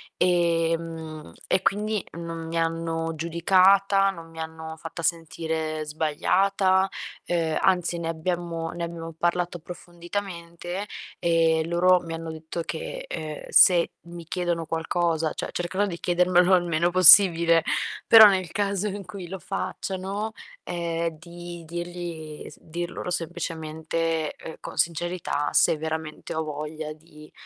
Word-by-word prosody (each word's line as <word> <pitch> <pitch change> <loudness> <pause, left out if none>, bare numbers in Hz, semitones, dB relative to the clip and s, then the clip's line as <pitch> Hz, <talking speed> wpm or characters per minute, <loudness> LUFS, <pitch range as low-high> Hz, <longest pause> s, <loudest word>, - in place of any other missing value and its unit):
ehm, 165 - 0
e 185 - +2
quindi 210 +1 0
non 165 -1 -6
mi 165 +1 -3
hanno 165 0 -1
giudicata, 190 +4 +4
non 165 -4 -8
mi 165 0 -12
hanno 160 0 -6
fatta 165 +1 -7
sentire 160 -1 -2
sbagliata, 185 +5 +2 0.4
ehm, 165 -2 0
anzi, 180 -2 +2
ne 165 - -3
abbiamo 165 0 -3
ne 170 0 -5
abbiamo 165 -1 -7
parlato 175 0 0
approfonditamente, 175 +2 -6 0.3
e 165 -1 +3
loro 180 +2 +4
mi 165 -1 -6
hanno 165 0 -5
detto 160 +2 -6
che, 160 0 -5
uhm, 155 -2 -5
se 175 -2 +6
mi 170 0 -9
chiedono 175 -1 -2
qualcosa 165 0 0
cioè - - -5
cercherò 185 +3 -1
di 170 -2 -5
chiedermelo 180 +1 +4
il 180 - +2
meno 170 +1 +1
possibile, 170 -2 +7 0.4
però 220 -1 +11
nel 185 -4 +1
caso 200 0 0
in 200 0 -5
cui 180 0 -8
lo 190 +2 -6
facciano, 195 +3 -4 0.3
ehm, 170 -1 -2
di 175 0 -9
dirgli 170 -2 -6
s - - -16
dir 175 +2 -5
loro - - -5
semplicemente, 165 -1 -3
uhm, 160 - -6
con - - -8
sincerità 170 -3 -1 0.2
se 160 - +1
veramente 160 0 -5
ho 160 - -1
voglia 155 +1 -5
di, 150 -1 -16
170 Hz, 135 wpm, -25 LUFS, 160-180 Hz, 0.4 s, però